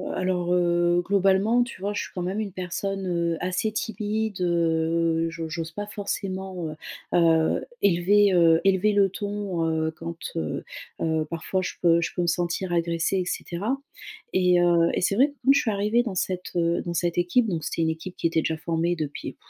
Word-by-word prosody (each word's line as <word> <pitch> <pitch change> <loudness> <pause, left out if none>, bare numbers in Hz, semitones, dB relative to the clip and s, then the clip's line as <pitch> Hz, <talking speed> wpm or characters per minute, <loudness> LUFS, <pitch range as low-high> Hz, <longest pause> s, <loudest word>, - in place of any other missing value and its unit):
alors, 180 -1 0
heu, 175 0 +2
globalement, 200 +5 +3
tu 235 -6 -9
vois, 205 +1 -2
je - - -2
suis - - -9
quand 180 - -4
même 190 +4 -2
une 205 -3 -3
personne, 190 +2 -4
heu, 170 -1 0
assez 185 +4 -1
timide, 215 -1 -2
heu, 165 -1 +1
j'o 165 -1 -6
j'ose 165 0 -4
pas 205 +5 -5
forcément, 190 -4 -4
heu, 155 - -7 0.4
heu, 165 -1 +3 0.2
élever 200 +2 +4
heu, 165 -2 +5
élever 195 +2 +3
le 200 -1 +4
ton, 200 -4 -3
heu, 160 0 0
quand, 165 +1 -7 0.2
heu, 80 -2 -3 0.4
heu, 160 -1 0
parfois 170 +3 -2
je - - -3
peux 170 -1 +5
je - - -2
peux - - 0
me 175 - -1
sentir 175 +2 -1
agressée, 170 +2 0
et 185 - 0
cetera, 200 +8 -2 0.6
et 180 -1 +4
heu, 170 -1 +4
et - - 0
c'est 195 +2 +1
vrai 270 +6 +4
que, - - -16
quand 275 - +7
je 280 - +4
suis 225 - 0
arrivée 210 +4 +1
dans 215 -6 -4
cette, 180 0 -3
heu, 170 0 +1
dans 175 - -4
cette 175 +1 0
équipe 180 +7 +2
donc 165 -5 -2
c'était 165 - -2
une 160 - +1
équipe 160 +3 -5
qui - - +1
était 165 -1 +1
déjà 160 0 -1
formée 165 +2 -1
depuis, 150 -3 -5
175 Hz, 200 wpm, -25 LUFS, 165-195 Hz, 0.6 s, quand